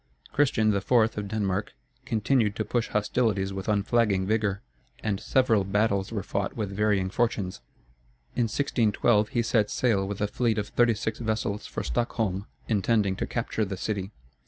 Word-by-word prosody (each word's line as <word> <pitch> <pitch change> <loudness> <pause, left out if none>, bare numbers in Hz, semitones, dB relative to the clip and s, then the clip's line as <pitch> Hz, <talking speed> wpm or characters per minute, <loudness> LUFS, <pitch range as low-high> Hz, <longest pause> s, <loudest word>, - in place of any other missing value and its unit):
Christian 110 -7 +3
IV., 100 +3 -3
of 110 -4 +3
Denmark, 105 -1 -2 0.3
continued 110 -1 +1
to 110 - -2
push 120 +2 0
hostilities 105 -2 0
with 95 +2 -4
unflagging 105 -2 +2
vigor, 105 -1 0 0.4
and 100 -3 -1
several 115 -6 +2
battles 100 0 +1
were 105 -4 -3
fought 100 0 -2
with 105 -3 -2
varying 100 -2 +1
fortunes. 105 -6 -1 0.7
In 120 - +2
1612, 110 -3 +2
he 120 -1 0
set 110 -2 +2
sail 100 -6 +1
with 100 0 -4
a 105 - +1
fleet 110 +1 0
of 105 -1 -2
thirty 120 -2 +3
six 110 0 -3
vessels 110 -2 -2
for - - -4
Stockholm, 100 - -1 0.2
intending 105 -2 +2
to - - -2
capture 115 -2 -2
the 95 -2 -3
city. 100 -1 -3
105 Hz, 160 wpm, -27 LUFS, 100-115 Hz, 0.7 s, Christian